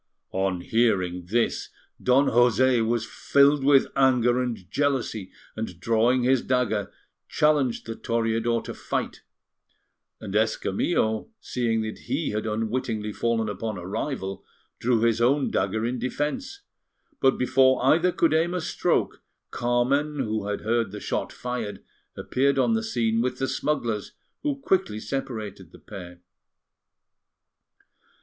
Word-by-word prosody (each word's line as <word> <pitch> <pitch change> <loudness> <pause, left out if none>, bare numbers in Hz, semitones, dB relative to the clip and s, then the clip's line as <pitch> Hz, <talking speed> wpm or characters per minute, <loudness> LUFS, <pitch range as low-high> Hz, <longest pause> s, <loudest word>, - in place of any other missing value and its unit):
On 95 -2 0
hearing 95 -6 +1
this, 115 +4 0 0.3
Don 130 +3 +4
José 120 0 +4
was 115 0 0
filled 140 +4 +3
with 140 -1 +5
anger 125 -2 +3
and 120 -3 -2
jealousy, 130 -8 -1 0.2
and 110 -6 -5
drawing 115 +5 +2
his 130 0 +3
dagger, 115 -6 0 0.4
challenged 145 -5 +2
the 115 - -5
Toreador 115 0 0
to - - -6
fight; - - -4 1.0
and 95 - -7
Escamillo, 110 - 0
seeing 115 -3 -1
that 110 0 -5
he 140 +6 -1
had 105 +1 -2
unwittingly 110 -1 -2
fallen 115 -1 0
upon 105 +1 -4
a 90 - -7
rival, 100 -1 -4 0.4
drew 120 -2 +2
his 115 0 +2
own 135 +4 +2
dagger 110 +1 0
in 125 +1 -2
defence. 150 - -3 0.6
But 130 - +3
before 130 0 +3
either 165 +6 +4
could 165 -2 +2
aim 165 +3 +2
a 180 - -1
stroke, - - 0 0.3
Carmen, 130 +5 +1
who 110 -6 -2
had 105 0 -2
heard 115 0 0
the 105 +2 -7
shot - - -3
fired, 115 -5 -5 0.3
appeared 140 +2 +1
on 180 +12 +3
the 225 - +1
scene 115 - 0
with 125 +1 -1
the 135 - -1
smugglers, 120 -10 -2 0.3
who 295 -2 0
quickly 190 - 0
separated 120 -5 -5
the - - -14
pair. 90 -3 -10
120 Hz, 135 wpm, -25 LUFS, 110-135 Hz, 1.0 s, with